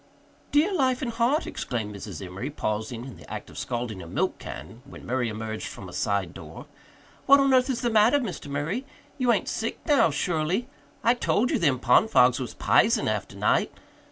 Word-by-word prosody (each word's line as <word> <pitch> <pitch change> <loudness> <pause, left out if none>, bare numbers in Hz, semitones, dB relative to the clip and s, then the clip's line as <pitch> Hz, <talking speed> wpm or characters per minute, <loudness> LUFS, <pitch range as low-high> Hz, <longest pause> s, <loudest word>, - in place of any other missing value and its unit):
"Dear 315 +7 +3
life 265 -5 +1
and 240 - -2
heart!" 235 +7 +1
exclaimed 110 -4 -4
Mrs. 100 0 -7
Emory, 95 +9 -5
pausing 110 -2 -3
in 130 - -10
the - - -14
act - - -6
of - - -13
scalding 120 -5 -4
a 85 - -9
milk - - -1
can 80 - -9
when 140 - -12
Murray 125 -1 0
emerged 110 0 -5
from 95 - -9
a 90 - -11
side 100 -5 -1
door. - - -10 0.6
"What 280 +1 +8
on 275 -1 +3
earth 255 +1 +4
is 255 - -1
the 240 -2 0
matter, 220 +5 +5
Mr. 225 - -4
Murray? 150 - -2 0.4
You 250 -2 +3
ain't 205 -5 +1
sick 225 - -2
now, 290 - +4
surely? 160 - -1 0.4
I 235 - +5
told 245 -1 +1
you - - +1
them 145 -6 +2
pond 125 - +4
fogs 125 - +5
was 125 - -5
p'isen - - +3
after - - -3
night! - - +2
145 Hz, 195 wpm, -26 LUFS, -, 0.6 s, What